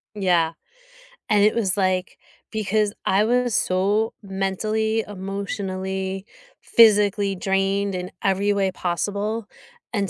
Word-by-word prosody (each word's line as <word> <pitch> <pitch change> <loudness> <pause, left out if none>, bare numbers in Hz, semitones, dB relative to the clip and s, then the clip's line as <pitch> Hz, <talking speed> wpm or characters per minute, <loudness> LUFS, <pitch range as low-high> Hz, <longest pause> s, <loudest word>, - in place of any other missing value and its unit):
Yeah. 175 -5 +2 0.8
And 205 -1 +4
it 215 - +4
was, 200 -5 +1
like 185 -1 0 0.4
because 215 0 +1
I 195 +2 +3
was 245 0 +1
so 200 +4 +1
mentally, 215 +3 -1
emotionally, 190 -1 -4 0.3
physically 205 -3 +4
drained 195 +1 0
in 180 0 -5
every 195 +1 +2
way 195 -2 +1
possible, 205 +5 -2 0.5
and 200 -3 0
200 Hz, 105 wpm, -23 LUFS, 190-210 Hz, 0.8 s, And